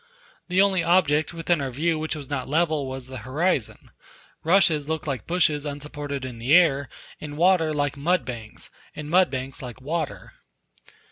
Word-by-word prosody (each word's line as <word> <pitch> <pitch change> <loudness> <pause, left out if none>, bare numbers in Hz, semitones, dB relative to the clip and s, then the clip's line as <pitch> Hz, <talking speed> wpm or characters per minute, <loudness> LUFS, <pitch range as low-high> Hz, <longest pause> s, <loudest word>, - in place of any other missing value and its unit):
The 185 +2 +4
only 190 -3 +2
object 155 -4 +3
within 170 -1 0
our 135 - -2
view 155 +5 0
which 155 0 -2
was 145 -3 -7
not 135 -2 -4
level 155 -2 +1
was 130 -1 -5
the 130 0 -8
horizon; 130 - -2 0.5
rushes 160 -4 +3
looked 160 +2 -2
like 140 -4 -4
bushes 155 -4 +2
unsupported 145 -1 -5
in 125 -3 -7
the 125 +6 +1
air, 145 -6 +4 0.3
and 145 -1 -7
water 175 -2 +3
like 145 -1 -1
mud 165 +1 +1
banks, 115 -4 -8 0.2
and 150 0 -7
mud 185 +1 +5
banks 130 0 -5
like 125 -1 -8
water. 155 +3 -4
150 Hz, 165 wpm, -24 LUFS, 135-170 Hz, 0.5 s, mud